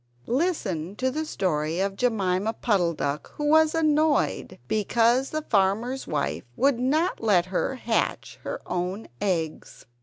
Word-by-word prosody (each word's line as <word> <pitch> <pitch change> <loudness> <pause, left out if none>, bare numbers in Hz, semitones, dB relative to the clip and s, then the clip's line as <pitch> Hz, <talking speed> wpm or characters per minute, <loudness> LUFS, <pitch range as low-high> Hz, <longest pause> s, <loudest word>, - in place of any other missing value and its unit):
Listen 225 - -1
to 260 +4 0
the 310 +3 -2
story 160 - -1
of 195 0 0
Jemima 205 -3 0
Puddle 180 -9 +1
duck, 145 +1 -3
who 295 - -3
was 315 +1 +4
annoyed 310 -1 +1
because 235 +5 +2
the 310 0 -3
farmer's 220 +4 0
wife 145 -2 -2
would 275 -3 +2
not 310 +8 +1
let 200 -6 +3
her 265 - 0
hatch 235 -3 -2
her - - -5
own 180 +4 -3
eggs. 165 -5 -3
225 Hz, 140 wpm, -26 LUFS, 185-275 Hz, -, was